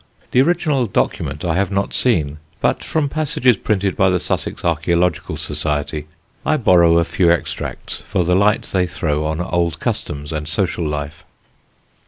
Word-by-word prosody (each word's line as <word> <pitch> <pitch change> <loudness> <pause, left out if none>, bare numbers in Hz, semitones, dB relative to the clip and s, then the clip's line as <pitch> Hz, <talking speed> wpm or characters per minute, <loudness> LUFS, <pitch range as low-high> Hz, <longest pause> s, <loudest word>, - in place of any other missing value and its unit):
The 125 - +5
original 150 -5 +1
document 75 -5 -1
I 85 - +1
have 100 -1 +1
not 100 0 -1
seen, 75 - +1 0.2
but - - 0
from 155 -2 0
passages 150 -4 +2
printed 100 -2 -1
by 95 - +3
the 90 0 +1
Sussex - - -3
Archæological 85 +2 0
Society 75 0 -2 0.4
I 155 - +2
borrow 85 - +5
a 85 - +4
few 90 0 +2
extracts 85 -1 -2
for 90 - 0
the 90 +1 +1
light 100 +2 +3
they 90 -1 0
throw 75 -3 -1
on 80 +1 -2
old 85 -2 -1
customs 75 +1 -3
and 75 -1 -4
social 85 -1 -1
life. 75 0 -4
90 Hz, 160 wpm, -19 LUFS, 75-100 Hz, 0.4 s, The